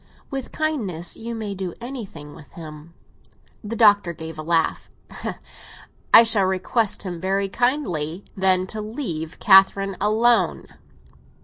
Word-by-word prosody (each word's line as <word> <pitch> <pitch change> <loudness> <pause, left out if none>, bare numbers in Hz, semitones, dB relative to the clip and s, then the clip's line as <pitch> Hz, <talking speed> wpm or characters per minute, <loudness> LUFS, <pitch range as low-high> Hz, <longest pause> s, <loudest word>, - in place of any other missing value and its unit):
With 270 -2 -5
kindness 215 - -3
you 230 +1 -6
may 215 -3 -4
do 185 -3 -5
anything 215 - -8
with 150 - -15
him." 155 0 -11 0.7
The 215 +2 -5
Doctor 205 -5 +4
gave 160 0 -8
a - - -2
laugh. 165 0 0 1.2
"I 230 - +10
shall 220 -4 +3
request 190 +4 -1
him 175 -4 -6
very 195 +1 0
kindly, 195 - -1
then, 185 -1 +3
to 215 +3 -6
leave 210 - -5
Catherine 195 -1 +5
alone." 225 +3 +2
195 Hz, 125 wpm, -22 LUFS, 170-225 Hz, 1.2 s, I